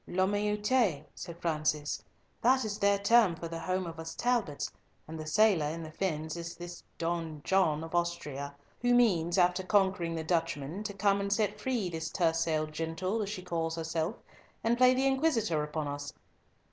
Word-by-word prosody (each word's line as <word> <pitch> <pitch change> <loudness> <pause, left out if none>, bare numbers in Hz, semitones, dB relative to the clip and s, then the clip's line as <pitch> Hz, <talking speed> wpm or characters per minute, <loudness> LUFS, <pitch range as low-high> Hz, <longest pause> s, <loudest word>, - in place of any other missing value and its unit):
"La 185 +1 +2
meute," 210 - +1
said 170 -1 -8
Francis, 155 -3 -1 0.4
"that 260 +1 +4
is 205 -1 -3
their 200 0 +4
term 200 -2 +4
for 165 - -6
the 165 0 -5
home 185 +3 -1
of 165 -1 -7
us 160 0 -6
Talbots, 230 -12 0 0.4
and 160 0 -7
the 155 - -6
sailor 180 -2 +4
in 165 +2 -4
the 155 - -8
fens 160 -3 -2
is 170 0 -6
this 175 0 -8 0.2
Don 165 -2 -2
John 165 -5 +2
of 165 - -8
Austria, 150 -5 -2 0.3
who 245 0 +4
means, 180 -8 +3
after 180 0 +4
conquering 190 -3 +2
the 160 - -3
Dutchmen, 165 0 -1
to 205 - -3
come 200 0 +2
and 200 0 -2
set 210 0 +1
free 240 -5 0
this 160 -2 -4
tercel 165 -3 +1
gentle, 165 +7 -2
as 200 - -2
she 200 -3 -5
calls 165 -2 -2
herself, 165 +4 -2 0.5
and 230 +1 +3
play 255 +1 +6
the 265 +1 +1
inquisitor 265 - +2
upon 150 0 -3
us. 145 0 -5
175 Hz, 180 wpm, -31 LUFS, 160-205 Hz, 0.5 s, play